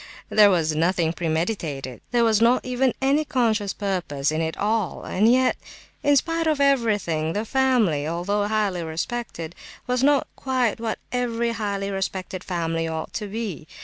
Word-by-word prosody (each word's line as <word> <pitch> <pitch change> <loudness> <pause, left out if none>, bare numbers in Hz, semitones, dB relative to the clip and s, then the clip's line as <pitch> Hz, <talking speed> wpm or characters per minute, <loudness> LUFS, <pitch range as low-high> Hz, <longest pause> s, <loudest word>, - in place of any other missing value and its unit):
There 210 -1 +6
was 160 -5 +1
nothing 165 0 +1
premeditated, 160 - -2
there 240 -1 +2
was 225 -1 +3
not 240 +2 +4
even 255 0 +1
any 280 +3 +3
conscious 225 -8 +1
purpose 175 -9 -2
in 155 +1 -1
it 160 0 -2
all, 215 -2 -1
and 215 +5 +3
yet, 255 +1 +3 0.4
in 290 0 +4
spite 330 +3 0
of 305 -2 +1
everything, 210 - +1
the 210 +2 -2
family, 225 - +2
although 200 +5 -1
highly 210 -4 0
respected, 165 0 -4 0.3
was 250 -1 0
not 280 0 +4
quite 255 -4 0
what 225 -1 -2
every 235 -1 0
highly 200 -3 -2
respected 190 -1 -4
family 165 -2 -2
ought 160 -1 -4
to 210 - -3
be. 200 -7 -5
205 Hz, 155 wpm, -24 LUFS, 165-240 Hz, 0.4 s, There